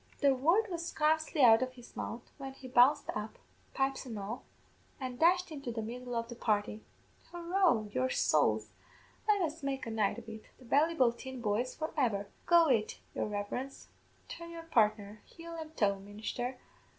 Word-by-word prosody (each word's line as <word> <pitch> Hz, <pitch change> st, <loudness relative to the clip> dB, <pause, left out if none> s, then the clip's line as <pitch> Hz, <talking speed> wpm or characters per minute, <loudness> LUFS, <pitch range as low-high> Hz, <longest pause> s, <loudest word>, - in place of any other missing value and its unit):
"The 280 Hz, -2 st, +5 dB
word 335 Hz, +12 st, +3 dB
was 340 Hz, -1 st, -3 dB
scarcely 315 Hz, -1 st, +2 dB
out 225 Hz, -1 st, +8 dB
of 255 Hz, 0 st, -2 dB
his 245 Hz, -2 st, -15 dB
mouth 235 Hz, +1 st, -5 dB, 0.2 s
when 270 Hz, -1 st, -6 dB
he 265 Hz, -1 st, -11 dB
bounced 255 Hz, +4 st, +4 dB
up, 210 Hz, +1 st, -5 dB, 0.4 s
pipes 270 Hz, 0 st, 0 dB
an' 235 Hz, -5 st, -6 dB
all, 210 Hz, +5 st, -5 dB, 0.6 s
an' 255 Hz, -2 st, -5 dB
dashed 360 Hz, +3 st, +3 dB
into 275 Hz, -5 st, -5 dB
the 225 Hz, -1 st, -3 dB
middle 245 Hz, +2 st, -5 dB
of 230 Hz, 0 st, -1 dB
the 240 Hz, -, -7 dB
party. 210 Hz, -2 st, -1 dB, 0.5 s
'Hurroo, 345 Hz, -, +2 dB
your 130 Hz, 0 st, +1 dB
sowls, 110 Hz, -8 st, +2 dB, 0.6 s
let 415 Hz, -2 st, +4 dB
us 320 Hz, 0 st, -3 dB
make 270 Hz, -2 st, -2 dB
a 230 Hz, -, -4 dB
night 215 Hz, -2 st, +1 dB
of 235 Hz, -1 st, -10 dB
it! 220 Hz, -1 st, -9 dB
The 255 Hz, -, -16 dB
Ballyboulteen 260 Hz, -3 st, +2 dB
boys 235 Hz, +2 st, -1 dB
for 315 Hz, 0 st, -4 dB
ever! 225 Hz, -9 st, +1 dB, 0.2 s
Go 340 Hz, -1 st, +6 dB
it, 225 Hz, -6 st, +1 dB, 0.2 s
your -, -, -1 dB
reverence 210 Hz, +6 st, -5 dB, 0.4 s
turn 335 Hz, 0 st, -8 dB
your 335 Hz, -1 st, -8 dB
partner 215 Hz, -7 st, +1 dB
heel 335 Hz, 0 st, -10 dB
an' 320 Hz, -1 st, -6 dB
toe, 200 Hz, -2 st, +2 dB
ministher. 215 Hz, +5 st, -5 dB
255 Hz, 175 wpm, -32 LUFS, 220-310 Hz, 0.6 s, out